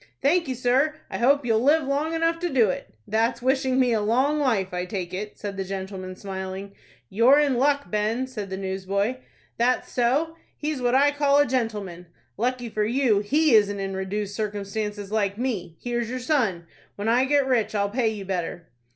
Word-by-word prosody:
"Thank 330 +4 +2
you, 260 - -2
sir. 260 +5 +2 0.2
I - - -3
hope 275 +3 +3
you'll 225 -2 +3
live 300 +5 +4
long 285 +4 -1
enough 330 0 +1
to 350 0 -1
do 235 - +3
it." - - -7 0.2
"That's 230 +3 +1
wishing 260 +1 +1
me 250 -2 +3
a 220 - +1
long 260 +8 +2
life, 215 -10 0
I 180 0 -2
take 180 -1 -5
it," 205 +3 -5
said 200 -2 -6
the 195 - -1
gentleman, 190 -1 -6
smiling. 190 0 -6 0.3
"You're 235 +8 +5
in 295 -2 +3
luck, 285 +1 +1
Ben," 215 +4 0
said 215 -7 -6
the 190 - -4
newsboy. 195 +4 -2 0.4
"That's 245 +2 +1
so. 285 +7 +1 0.2
He's 300 -3 -3
what 245 +1 +2
I 285 +2 +5
call 285 -1 +2
a 290 - +5
gentleman." 210 -9 -3 0.3
"Lucky 245 +2 -1
for 215 -1 -1
you 235 -1 +2
he 290 +8 +2
isn't 205 -2 +4
in 195 0 -3
reduced 200 +1 -3
circumstances 205 -1 -4
like 200 -2 0
me. 210 -10 -3
Here's 240 -1 -2
your 255 - -3
'Sun.' 245 - 0 0.3
When 205 +2 -4
I 245 +3 +4
get 285 0 +3
rich 240 -5 +1
I'll 200 0 0
pay 235 0 +1
you 210 -3 -6
better." 175 -2 -4
230 Hz, 195 wpm, -25 LUFS, 200-265 Hz, 0.4 s, You're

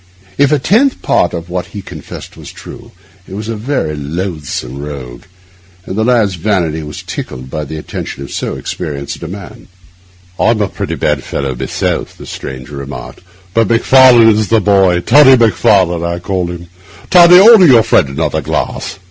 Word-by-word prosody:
If 140 +1 +2
a 150 - +3
tenth 230 - +1
part 90 - +1
of 85 -1 -6
what 90 0 -4
he 100 - -7
confessed 80 -5 -10
were - - -13
true, - - -12 0.4
he - - -11
was 105 +1 -6
a 115 - -3
very 110 - -3
loathsome 75 -4 -5
rogue; 65 -5 -8 0.6
and 95 - -6
the 110 - 0
lad's 115 -5 +2
vanity 85 -4 -1
was 75 -1 -8
tickled 65 0 -7
by 75 -1 -4
the 80 +2 -7
attention 70 -2 -7
of 70 - -10
so - - -4
experienced 70 -5 -6
a 85 - -6
man. 95 +3 -10 0.7
'I'm 115 -1 +2
a 100 -2 0
pretty - - -5
bad 75 -3 -1
fellow 70 -1 -4
myself,' 65 +1 -3
the - - -11
stranger 65 +2 -8
remarked, 70 0 -8 0.3
'but 115 -2 +1
Macfarlane 120 0 +5
is 110 -1 +1
the 115 +2 +3
boy—Toddy 100 +8 +4
Macfarlane 95 -6 +2
I 85 0 -2
call 90 0 -3
him. 85 0 -7 0.5
Toddy, 175 0 +8
order 210 -3 +8
your 120 -5 +6
friend 85 - +2
another 70 - -2
glass. - - -4
90 Hz, 170 wpm, -13 LUFS, 75-115 Hz, 0.7 s, Toddy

